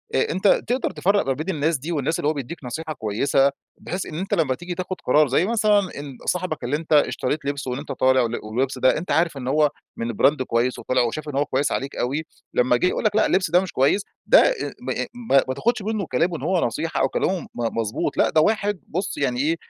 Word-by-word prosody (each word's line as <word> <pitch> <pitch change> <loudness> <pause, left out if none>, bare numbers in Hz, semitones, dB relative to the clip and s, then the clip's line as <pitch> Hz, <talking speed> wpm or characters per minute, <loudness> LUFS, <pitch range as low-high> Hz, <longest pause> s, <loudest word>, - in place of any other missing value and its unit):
آآ - - +2
أنت 190 +5 +1 0.2
تقدر 250 +3 0
تفرّق 200 +2 +1
ما 135 - +2
بين 155 +7 -5
الناس 155 +2 +1
دي، 150 +6 -6
والناس 160 0 -1
اللي - - 0
هو - - +1
بيديك 145 +2 -7
نصيحة 155 +6 -5
كويسة، 135 +4 +1 0.3
بحيث 185 +1 -4
إن 155 - -8
أنت 190 +5 -3
لما 140 -6 +2
تيجي 175 +3 -6
تأخُد 185 +1 -4
قرار، 150 +4 +4
زي 135 +7 +2
مثلًا 215 -1 +3
ال 145 -9 -6
صاحبك 180 -4 -2
اللي 125 +4 0
أنت 160 +1 -2
اشتريت 150 0 +1
لبسه، 140 -2 -3
وإن 125 - -3
أنت 145 - -7
طالع، 130 0 +3
وال 120 0 -1
واللبس 125 +5 -2
ده، 130 - +4
أنت 175 +5 -4
عارف 165 -3 +2
إن 125 -2 -6
هو 150 +2 +3 0.3
من 115 0 -2
Brand 140 +6 +3
كويس 125 +1 0
وطلع، 130 0 +1
وشاف 135 +6 -2
إن 145 - -6
هو 145 +1 +2
كويس 140 +1 0
عليك 135 +1 -3
أوي، 140 +6 -2 0.3
لمّا 125 0 +3
جه - - 0
يقول - - -1
لك 210 -1 +2
لأ، 220 - +4
اللبس 185 -4 +1
ده 175 - +6
مش 190 - -5
كويس، 140 +10 +2 0.2
ده - - +7
آآ - - +4 0.3
م - - -3 0.2
م 245 -1 -10 0.2
ما 130 - -1
تاخدش 235 - 0
منُه 210 -1 -2
كلامُه 170 +1 +1
إن - - -10
هو 185 -1 +1
نصيحة، 165 -1 -2
أو 135 - +2
كلامُه 185 +4 -1
مضبوط 115 -2 -2
لأ، - - +4
ده 155 - +3
واحد 205 +1 +1
بُص 190 +4 -3
يعني 125 -3 0
إيه، 155 +5 +2
150 Hz, 240 wpm, -23 LUFS, 130-180 Hz, 0.3 s, ده